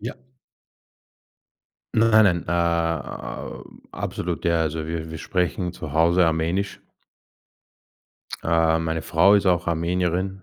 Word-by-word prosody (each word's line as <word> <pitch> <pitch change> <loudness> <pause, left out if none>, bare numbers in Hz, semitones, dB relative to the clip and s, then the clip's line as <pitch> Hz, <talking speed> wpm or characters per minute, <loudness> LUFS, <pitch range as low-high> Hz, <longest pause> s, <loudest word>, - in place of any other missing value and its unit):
Ja. 115 - -6 1.8
Nein, 110 -1 +5
nein. 85 -3 +2
Äh, - - -2
a 85 -1 -2 0.3
absolut, 85 -1 -4
ja. 85 -1 +2
Also, 80 0 -2
wir 80 -1 -4
wir 80 - -6
sprechen 90 0 -2
zu 80 -5 -8
Hause 85 +2 +4
Armenisch. 85 +5 -1 1.6
Äh, 80 0 +2
meine 80 0 -2
Frau 95 +5 +4
ist 100 - +2
auch 90 -1 +2
Armenierin, 90 +3 -1
85 Hz, 115 wpm, -23 LUFS, 80-90 Hz, 1.8 s, Nein